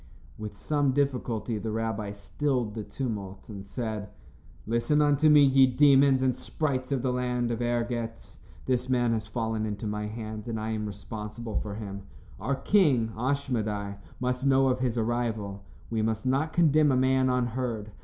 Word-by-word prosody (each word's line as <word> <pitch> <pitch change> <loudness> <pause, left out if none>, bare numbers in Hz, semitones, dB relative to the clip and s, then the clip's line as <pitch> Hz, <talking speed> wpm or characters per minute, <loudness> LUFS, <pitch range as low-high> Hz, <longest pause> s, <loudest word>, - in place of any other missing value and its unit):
With 105 -1 -7
some 145 0 +1
difficulty, 125 -5 -1
the 110 - -4
rabbi 110 -2 -2
stilled 120 +2 -2
the 110 - -4
tumult, 100 -7 -5
and 100 -2 -7
said: 110 -1 -4 0.6
"Listen 120 +7 +1
unto 145 +1 +4
me, 150 -1 +8
ye 135 -1 +6
demons 135 0 +5
and 130 -2 +2
sprites 130 -1 -2
of 130 -3 0
the 130 -1 +1
land 125 -1 -1
of 120 0 -2
Ergetz. 120 -1 -2 0.3
This 125 0 0
man 120 -2 +2
has 110 -2 -2
fallen 110 -1 -2
into 105 0 -4
my 105 0 -2
hands, 110 0 -6
and 115 -2 -3
I 110 +1 -3
am 105 -1 -2
responsible 105 +2 -6
for 105 -1 -5
him. 100 -2 -6 0.4
Our 140 - -1
king, 135 - +3
Ashmedai, 110 -6 -1 0.2
must 125 +1 -1
know 135 -1 +4
of 130 0 0
his 125 -2 0
arrival. 110 -4 -2 0.3
We 110 -1 0
must 110 +1 -1
not 135 +5 +1
condemn 155 -3 +4
a 130 - +3
man 130 0 +3
unheard. 120 -3 -1
120 Hz, 165 wpm, -28 LUFS, 110-130 Hz, 0.6 s, me